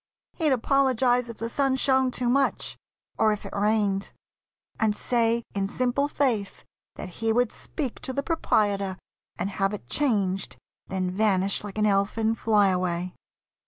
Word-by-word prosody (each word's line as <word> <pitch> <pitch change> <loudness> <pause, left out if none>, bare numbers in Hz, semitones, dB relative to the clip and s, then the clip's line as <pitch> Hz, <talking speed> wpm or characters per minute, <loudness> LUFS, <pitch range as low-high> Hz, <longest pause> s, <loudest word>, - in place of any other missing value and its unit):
He'd 315 -4 +1
apologise 255 -1 +2
If 230 - -8
the 230 - -3
sun 270 +2 +1
shone 265 -1 +2
too 250 0 -2
much, 270 +3 +1 0.4
or 220 -1 +4
if 210 - -4
it - - -7
rained, 205 -1 +1 0.7
And 215 -1 +2
say 235 0 +1
in 195 -1 -1
simple 255 +6 0
faith 240 -9 -1 0.3
that 185 - -7
he 225 +5 -1
would 245 0 +2
speak 270 -7 -4
To - - -4
the 280 +2 -2
proprietor 205 - 0 0.4
and 195 +3 -2
have 195 +1 0
it 155 - -12
changed, 200 - 0 0.3
Then 185 -1 -2
vanish 195 -1 +2
like 205 0 -8
an 210 - +2
elfin 210 +2 +1
fly 210 -3 +3
away. 180 -1 -1
220 Hz, 155 wpm, -26 LUFS, 195-250 Hz, 0.7 s, or